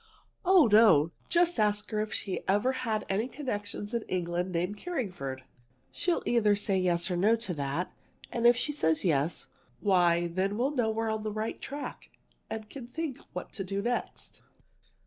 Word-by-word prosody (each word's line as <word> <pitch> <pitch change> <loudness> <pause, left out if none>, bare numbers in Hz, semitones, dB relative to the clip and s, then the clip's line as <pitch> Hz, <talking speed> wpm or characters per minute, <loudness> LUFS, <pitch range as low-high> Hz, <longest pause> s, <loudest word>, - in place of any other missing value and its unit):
"Oh, 370 -4 +6
no! 210 -8 +6 0.2
Just 345 -5 +3
ask 210 0 +1
her 215 -1 0
if 215 0 -3
she 190 - -2
ever 205 +7 +3
had 225 -5 -2
any 205 +5 0
connections 210 -6 -5
in 235 - 0
England 180 0 -1
named 180 +4 -1
Carringford. 180 - -4 0.5
She'll 350 -1 0
say - - 0
either 220 -3 +4 0.2
yes 180 -1 +1
or - - +1
no 205 +6 +4
to 230 -5 -3
that. 145 +4 -3 0.4
And 235 0 +3
if 240 0 +6
she 295 - 0
says 160 - +1
yes, 155 -1 +1 0.3
why 175 -4 +3
then 190 +4 -1
we'll 260 +4 +1
know 240 -5 +1
we 220 +1 -1
are 225 - 0
on 220 0 -2
the 215 0 -3
right 215 +1 -3
track 285 +1 -6 0.4
and 220 -1 -5
can 250 0 -9
think 295 +1 -4
what 180 - -6
to 195 - -4
do 195 +1 -3
next." 245 +1 -3
210 Hz, 180 wpm, -29 LUFS, 180-240 Hz, 0.5 s, Oh